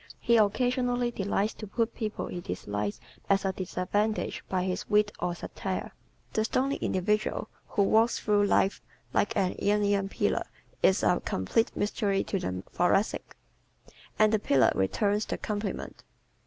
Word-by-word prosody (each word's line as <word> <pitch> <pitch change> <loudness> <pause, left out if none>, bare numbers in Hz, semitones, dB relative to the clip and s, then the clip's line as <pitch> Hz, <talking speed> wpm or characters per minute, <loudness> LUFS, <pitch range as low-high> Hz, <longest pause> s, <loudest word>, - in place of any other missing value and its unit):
He 235 -1 +3
occasionally 245 +3 +2
delights 200 0 0
to 215 - -8
put 230 +3 -1
people 215 -2 -3
he 175 - -5
dislikes 105 - -3 0.3
at 195 0 +3
a 190 - +2
disadvantage 195 +4 -1
by 185 -1 0
his 185 -1 -3
wit 210 0 +3
or 175 -1 -1
satire. - - -4 0.4
The 220 - +2
stony 270 +5 0
individual 210 +3 0 0.2
who 200 - +1
walks 225 +3 +3
through 205 -1 +2
life 195 0 +2 0.3
like 205 - +1
an 190 -2 +1
Ionian 205 -1 +2
pillar - - 0 0.3
is 190 - +4
a 180 - +3
complete 160 - 0
mystery 205 -1 0
to 195 - -2
the 90 - -3
Thoracic; 195 +4 +1 0.8
and 215 0 +4
the 215 - +3
pillar 140 -9 +4
returns 205 - +1
the - - -2
compliment. 205 -1 -4
205 Hz, 145 wpm, -29 LUFS, 185-220 Hz, 0.8 s, is